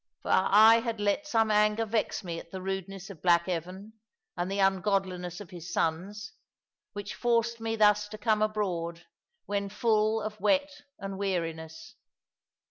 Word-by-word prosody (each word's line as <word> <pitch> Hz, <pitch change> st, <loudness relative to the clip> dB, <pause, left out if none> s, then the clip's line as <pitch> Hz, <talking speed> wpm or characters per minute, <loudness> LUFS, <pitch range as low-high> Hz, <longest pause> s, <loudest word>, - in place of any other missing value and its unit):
For -, -, -2 dB
I 215 Hz, +4 st, +6 dB
had 230 Hz, -2 st, -3 dB
let 205 Hz, +9 st, 0 dB
some 225 Hz, -5 st, +2 dB
anger 210 Hz, +1 st, +3 dB
vex 220 Hz, 0 st, -1 dB
me 170 Hz, -2 st, -4 dB
at -, -, -13 dB
the 190 Hz, -, -6 dB
rudeness 195 Hz, 0 st, -5 dB
of 165 Hz, -6 st, -13 dB
black 170 Hz, -1 st, +3 dB
Evan, 185 Hz, +4 st, -5 dB, 0.4 s
and 175 Hz, +1 st, -2 dB
the 195 Hz, -, -2 dB
ungodliness 190 Hz, -2 st, 0 dB
of 205 Hz, -2 st, -10 dB
his 175 Hz, -1 st, -8 dB
sons, 195 Hz, +8 st, -2 dB, 0.6 s
which 205 Hz, 0 st, -6 dB
forced 235 Hz, -1 st, 0 dB
me 225 Hz, 0 st, -2 dB
thus 210 Hz, -1 st, +4 dB
to 215 Hz, +1 st, -9 dB
come 215 Hz, 0 st, +1 dB
abroad, 175 Hz, -6 st, -2 dB, 0.4 s
when 200 Hz, -1 st, -2 dB
full 220 Hz, 0 st, +1 dB
of 215 Hz, -1 st, -6 dB
wet 285 Hz, 0 st, +2 dB, 0.3 s
and 195 Hz, -1 st, -6 dB
weariness. 160 Hz, -4 st, -4 dB
200 Hz, 155 wpm, -29 LUFS, 180-215 Hz, 0.6 s, I